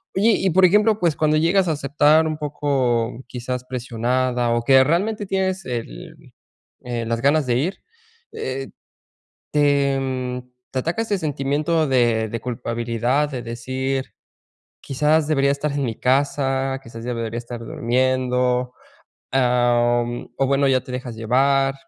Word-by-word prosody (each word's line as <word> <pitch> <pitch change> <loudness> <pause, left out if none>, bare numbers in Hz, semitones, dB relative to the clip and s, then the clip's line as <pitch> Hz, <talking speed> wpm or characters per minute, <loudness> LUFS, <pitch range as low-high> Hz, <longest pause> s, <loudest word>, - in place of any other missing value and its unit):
Oye, 210 +5 +4
y 190 - +1
por 185 +2 +5
ejemplo, 210 +3 +4
pues 170 -5 +1
cuando 155 0 +2
llegas 175 +3 +2
a - - +2
aceptar 150 +2 +3
un 155 -1 -3
poco, 130 -5 -1
quizás 125 0 -5
presionada 125 0 -1
o 120 0 +1
que 130 +1 +6
realmente 205 +9 0
tienes 190 0 -1
el 115 - -7 0.5
eh, 120 -2 -3
las 115 0 -2
ganas 145 +2 +3
de 120 - +2
ir, 175 +9 -1 0.6
eh, 135 +1 -4 0.8
¿te 140 -2 +2
mm, 130 -1 -3 0.3
te 130 - -1
ataca 170 - -1
ese 205 -3 -1
sentimiento 150 +2 0
de 120 -4 +2
de 115 - -4
culpabilidad?, 120 +3 -1
de 130 -3 -4
decir: 130 +3 -3 0.7
"Quizás 150 +3 +1
debería 140 -3 +2
estar 145 +2 -2
en 140 -1 -1
mi 115 -3 -3
casa, 135 0 +1
quizás 115 -1 -10
debería 115 -1 -3
estar 120 0 -7
durmiendo". 125 +1 0 0.6
Em, 120 -1 +1
o 135 - +1
bueno, 140 +1 +2
¿ya 130 -1 +3
te 125 - -9
dejas 125 -2 -5
llevar? 135 +4 +2
130 Hz, 145 wpm, -21 LUFS, 120-150 Hz, 0.8 s, que